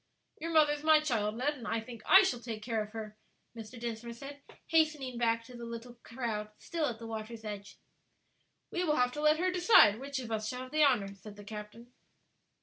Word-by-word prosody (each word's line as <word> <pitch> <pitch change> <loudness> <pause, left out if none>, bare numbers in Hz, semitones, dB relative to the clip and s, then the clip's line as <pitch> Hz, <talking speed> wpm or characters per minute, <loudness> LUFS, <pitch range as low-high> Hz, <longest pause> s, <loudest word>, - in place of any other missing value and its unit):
"Your 330 +2 -4
mother 305 -2 +5
is 295 - -5
my 310 0 +6
child, 225 -8 -1
Ned, 285 +5 +1
and 230 - -7
I 225 - 0
think 225 0 -9
I 380 +1 +9
shall 250 -10 0
take 225 -3 -6
care 225 -1 -1
of 210 - -5
her," 215 -1 -7 0.4
Mr. 225 +1 -9
Dinsmore 235 0 -5
said, 280 +4 -10 0.2
hastening 305 -6 +1
back 230 -1 +1
to 250 +1 -13
the 235 - -8
little 235 +1 -8
crowd 230 -3 -4
still 330 -3 -2
at 235 - -4
the 230 - -9
water's 225 0 -6
edge. 205 -1 -7 0.9
"We 355 - -1
will 305 -4 +2
have 250 -2 +2
to 295 - -5
let 305 0 +4
her 365 +2 +1
decide 350 - +6
which 275 +1 -5
of 245 -3 -5
us 215 -1 -2
shall 250 +2 -4
have 255 0 -9
the 310 0 +3
honor," 220 -9 +3
said 200 +2 -12
the 205 - -11
captain. 215 +3 -9
235 Hz, 220 wpm, -32 LUFS, 220-290 Hz, 0.9 s, I